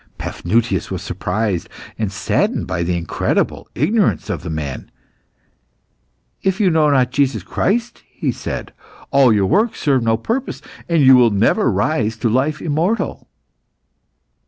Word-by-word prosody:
Paphnutius 115 +6 -1
was - - -4
surprised 100 -2 -2 0.3
and 110 -3 -2
saddened 95 - 0
by 95 -1 -3
the 85 +1 0
incredible 85 -1 -1
ignorance 170 - +1
of - - -4
the - - -6
man. 75 -4 -5 1.5
"If 190 -1 0
you 195 -4 +3
know 155 -2 +3
not 130 -3 +2
Jesus 135 -7 0
Christ," 230 - -1
he - - -2
said, - - -6 0.4
"all 135 -3 +5
your 100 -3 +3
works 210 - +1
serve 135 -4 +2
no 115 -1 +1
purpose, 235 - -3 0.3
and 165 -3 +3
you 130 0 +8
will 125 -2 +6
never 105 +3 +2
rise 110 +2 0
to 115 +1 0
life 140 +6 0
immortal." 170 +8 -1
125 Hz, 140 wpm, -19 LUFS, 105-155 Hz, 1.5 s, you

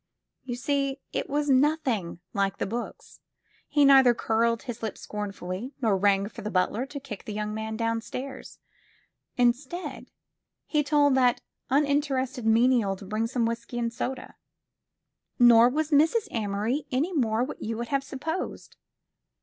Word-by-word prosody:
You 245 -2 -4
see, 275 +2 -1 0.2
it - - -2
was 290 +1 0
nothing 260 - +1
like 195 -1 0
the - - -1
books. 235 +4 -6 0.5
He 290 -1 +3
neither 265 -3 +7
curled 230 0 +1
his 240 -2 -6
lip 220 - -4
scornfully 205 +4 -6
nor 220 -6 +2
rang 195 0 +2
for - - -10
the 210 - -4
butler 210 +6 0
to 285 0 -7
kick 245 -8 -9
the 215 - -5
young 210 0 -3
man 220 0 -4
downstairs. 230 +4 -4 0.8
Instead, 260 +8 -1 0.6
he 300 - +1
told 290 -1 +3
that 250 -2 +3 0.3
unin 285 +1 +3
terested 260 -3 -3
menial 225 -2 +3
to 195 - -11
bring 215 +3 -1
some 240 -1 0
whisky 235 +1 -4
and 235 -1 -1
soda. 255 +2 -4 1.0
Nor 240 -1 +7
was 310 +4 -1
Mrs. 325 +10 +3
Amory 220 +6 -2
any 295 +9 0
more 235 -6 +1
what 260 - -6
you 225 0 -3
would 235 0 -4
have 275 -1 0
supposed. 315 +6 -5
240 Hz, 150 wpm, -27 LUFS, 220-275 Hz, 1.0 s, neither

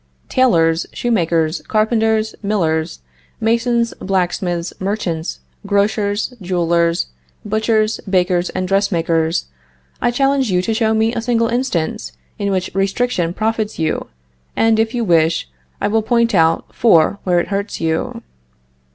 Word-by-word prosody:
Tailors, 165 -10 +3
shoemakers, 170 -8 0
carpenters, 220 0 +1
millers, 165 - -1 0.4
masons, 235 +1 +1
blacksmiths, 180 -2 -1
merchants, 185 -4 -3 0.3
grocers, 205 +2 0
jewelers, 170 -2 +1 0.4
butchers, 215 +1 +1
bakers 180 -1 +1
and 185 - -3
dressmakers, 170 -4 +1 0.6
I - - +3
challenge 270 0 +1
you 180 0 +2
to 225 - 0
show 220 0 +1
me 220 +1 +2
a 230 - -2
single 230 -1 +1
instance 190 - -2 0.3
in 200 - -1
which 185 -1 -1
restriction 195 -2 0
profits 220 +2 -2
you, 160 -1 -1 0.5
and 225 -1 +3
if 225 +2 0
you 240 - 0
wish, 165 - +2 0.3
I - - 0
will 220 +1 +2
point 235 +1 +1
out 165 -2 +2
four 200 -3 +4
where 180 -2 +2
it - - -3
hurts 200 +1 -3
you. 160 0 -2
200 Hz, 125 wpm, -18 LUFS, 170-225 Hz, 0.6 s, four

